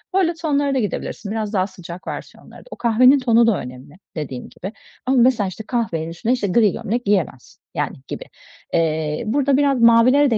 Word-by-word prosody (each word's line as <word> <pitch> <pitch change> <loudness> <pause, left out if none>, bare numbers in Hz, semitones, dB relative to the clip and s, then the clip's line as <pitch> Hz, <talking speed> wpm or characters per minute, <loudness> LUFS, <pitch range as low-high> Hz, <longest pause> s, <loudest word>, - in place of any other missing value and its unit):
böyle 360 -3 +3
tonlara 290 -4 0
da - - +2
gidebilirsin, 205 -1 -4
biraz 215 -1 -3
daha 190 -2 +1
sıcak 180 -2 -10
versiyonlara - - -9
da. - - -20
O - - -6
kahvenin 250 +4 +4
tonu 235 -2 +4
da 220 -5 +3
önemli 125 +4 -10 0.2
dediğin 135 -5 -6
gibi 190 +4 -8 0.3
ama 260 +1 +2
mesela, 240 -4 +4
işte, 190 +4 -7
kahvenin 170 -10 -2
üstüne, 195 +9 -1
işte, 240 -5 -1
gri 210 +1 +3
gömlek 240 +4 -3
giyilmez, 185 -10 -1 0.2
yani, - - -2
gibi. - - -6 0.5
Eee, 160 0 0
burada 275 +3 +2
biraz 280 -3 +2
mavilere 245 +5 +5
de 225 - +3
225 Hz, 185 wpm, -20 LUFS, 180-255 Hz, 0.5 s, mavilere